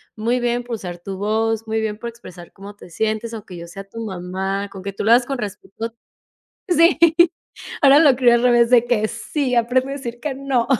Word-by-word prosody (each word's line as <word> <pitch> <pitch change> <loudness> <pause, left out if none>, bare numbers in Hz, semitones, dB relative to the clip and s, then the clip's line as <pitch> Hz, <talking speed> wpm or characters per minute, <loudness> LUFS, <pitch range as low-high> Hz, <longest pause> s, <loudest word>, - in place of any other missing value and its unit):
muy 235 +3 0
bien 240 0 -1
por 240 -1 -4
usar 180 -5 -7
tu 190 +2 -7
voz, 220 +2 -1
muy 220 0 -1
bien 210 -1 -3
por 235 - -7
expresar 180 -7 -13
cómo 200 +1 -11
te 180 - -14
sientes, 220 +5 -2
aunque 200 -5 -8
yo 170 0 -9
sea 195 +3 -9
tu 225 +3 -8
mamá, 190 +1 -4
con 190 -1 -10
que 200 0 -5
tú - - -5
lo 220 - +3
hagas 240 +1 +5
con 270 +1 -3
respeto 220 +1 -6 0.8
Sí, 335 0 +4 0.8
ahora 280 +1 +7
lo 280 -6 +5
crio 245 -2 +5
al 240 - +2
revés 240 -1 +4
de 240 -1 +5
que, 215 -3 +1
sí 250 +4 -3
aprende 250 +3 +1
a - - -4
decir 240 -4 -6
que 275 +1 -4
no. 270 -3 -1
230 Hz, 215 wpm, -20 LUFS, 200-245 Hz, 0.8 s, ahora